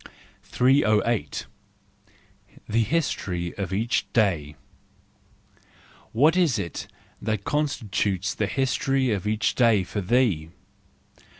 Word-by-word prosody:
308. 120 -4 +1 1.2
The 115 +2 +2
History 100 - -1
of 95 -3 -4
each 115 +7 -1
Day 85 -10 +1 1.6
.—What 150 +9 +4
is 170 -10 +3
it 85 -5 -5 0.3
that 110 -2 -2
con¬ 150 +4 0
stitutes 100 -6 -2
the 105 - -1
history 135 +1 0
of 100 -1 -2
each 110 +1 +1
day 115 -6 +3
for 105 +3 -4
thee? 100 -7 +1
110 Hz, 100 wpm, -25 LUFS, 95-130 Hz, 1.6 s, What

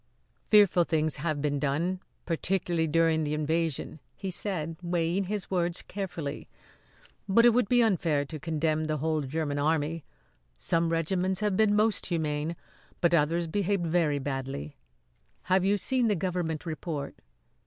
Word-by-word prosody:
"Fearful 205 -4 +6
things 155 -2 0
have 150 -1 -2
been 145 -1 0
done, 155 +6 0 0.3
particularly 170 -1 0
during 160 0 +2
the 150 0 -1
invasion," 160 0 -1 0.2
he 195 -2 -5
said, 165 -4 -3
weighing 175 +2 0
his 205 0 -3
words 175 -2 0
carefully; 175 -7 -5 0.8
"but 230 +5 +5
it 240 - +8
would 230 -3 +1
be 245 -1 +5
unfair 165 -9 +1
to 155 +2 -7
condemn 155 0 0
the 155 0 -1
whole 155 +1 0
German 145 +1 -2
Army. 155 +1 0 0.5
Some 165 - +1
regiments 180 +3 0
have 210 -2 +1
been 210 0 +3
most 215 0 +2
humane; 155 -1 -1 0.4
but 170 0 +2
others 165 +2 +2
behaved 195 +1 0
very 160 -3 +2
badly. 135 - -4 0.7
Have 185 0 +2
you 200 +2 +3
seen 250 +4 +1
the 210 - +2
government 175 -3 -2
report?" 155 -3 -4
165 Hz, 145 wpm, -28 LUFS, 155-185 Hz, 0.8 s, it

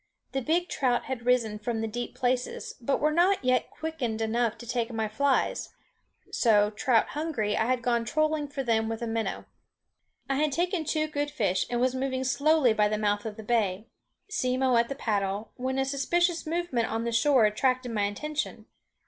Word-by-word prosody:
The 270 - -1
big 340 +7 +1
trout 250 -6 0
had 250 -2 -5
risen 230 -4 +2
from 225 +1 -2
the 225 - -1
deep 240 +2 -5
places, 250 0 -1
but 270 +3 0
were 305 +1 +2
not 350 -1 +2
yet 255 0 +2
quickened 280 -9 -4
enough 225 0 0
to 240 - -10
take 235 0 -2
my 220 -1 -1
flies; 265 +6 0 0.6
so, 210 -3 +3
trout 230 +2 +2
hungry, 285 -10 -1
I - - +1
had 250 -1 0
gone 235 -1 +1
trolling 310 +4 0
for 280 -1 -4
them 225 -2 +1
with 225 +1 -4
a - - 0
minnow. 225 0 -2 0.8
I 270 - 0
had 300 -1 +1
taken 345 0 0
two 310 +1 0
good 290 -1 -2
fish, 195 -8 0
and 240 - -1
was 255 +1 +2
moving 260 0 -2
slowly 265 0 +3
by 210 -1 +3
the 215 0 -1
mouth 205 0 0
of 215 0 -7
the 220 - -8
bay, 215 -3 0 0.4
Simmo 255 - +1
at 235 0 +3
the 275 - -3
paddle, 205 -3 -2
when 260 +1 -2
a 270 - +1
suspicious 340 +5 0
movement 320 -9 -1
on 225 +1 -1
the 235 - -1
shore 250 0 +4
attracted 250 +3 +1
my 210 -2 +1
attention. 300 +9 -4
245 Hz, 190 wpm, -28 LUFS, 225-285 Hz, 0.8 s, shore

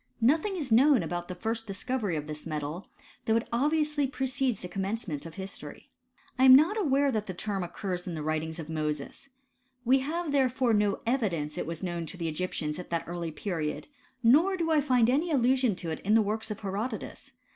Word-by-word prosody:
Nothing 310 - +2
is 290 -9 -4
known 265 +3 +5
about 175 0 -4
the 180 - -6
first 225 +4 -3
discovery 210 -1 -2
of 150 -1 -3
this 150 0 -7
metal; 155 +3 -4 0.4
though 220 - +2
it 230 - 0
obviously 300 +2 +2
precedes 260 -3 -1
the - - -4
commencement 190 -5 -3
of 165 - -11
history. 195 0 -8 0.5
I 260 - +6
am 260 0 +11
not 320 +9 +5
aware 285 -8 +2
that 215 -3 -2
the 185 - -5
term 200 +1 -2
occurs 180 0 -4
in 175 - -3
the 155 - -4
writings 155 +1 -2
of 160 -3 -6
Mosea, 150 -3 -2 0.7
We 260 +3 +5
have 315 +4 -2
therefore 260 -3 +2
no 205 -1 +1
evidence 190 - 0
that - - -3
it - - -5
was 165 +2 -5
known 170 -2 -3
to 180 - -7
the 170 -2 -2
Egyptians 155 -1 -3
at 180 - -8
that 170 -1 -1
early 170 -1 -4
period; 160 - -4 0.3
nor 320 +12 +5
do 335 - 0
1 315 -2 +3
find 250 -5 +3
any 290 +8 +2
allusion 255 - +3
to 170 -2 -5
it 160 - -4
in 210 +3 +2
the 225 - +5
works 220 +2 -2
of 210 0 -5
Herodotus. 210 +4 -5
215 Hz, 205 wpm, -29 LUFS, 170-265 Hz, 0.7 s, am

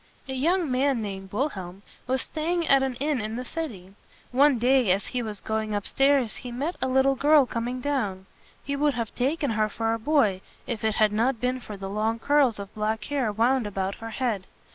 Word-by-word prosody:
A 265 - -4
young 325 +3 +1
man 260 0 +2
named 195 -2 -6
Wil 265 +9 0
helm 190 -4 -9 0.2
was 260 +1 0
staying 330 +1 -2
at 275 -1 +6
an 265 -2 -1
inn 285 -1 -1
in 215 +1 -4
the 250 +1 -4
city. 220 - -6 0.4
One 275 +1 +5
day 250 -1 +3
as 190 +2 +2
he 250 - -3
was 215 -3 -5
going 220 -1 -2
up 205 - -2
stairs 270 -4 +2
he 250 - -7
met 285 +9 -2
a - - +1
little 265 +1 +3
girl 290 +1 +5
coming 245 +1 -3
down. 210 -10 -2 0.4
He 280 - -2
would 290 -1 +1
have 230 -3 -3
taken 280 +2 0
her 215 -1 +1
for 225 +2 -1
a 230 - -2
boy, 220 -8 +2 0.2
if 230 -3 -4
it 220 -1 +1
had 215 -1 +3
not 230 +3 +1
been 250 +2 -1
for 215 -4 -8
the 195 0 -6
long 215 +3 -1
curls 275 -2 +3
of 200 0 -8
black 215 0 -1
hair 270 -5 -1
wound 235 +2 +2
about 195 -1 -2
her 225 - -5
head. 220 -4 -2
245 Hz, 215 wpm, -26 LUFS, 215-275 Hz, 0.4 s, at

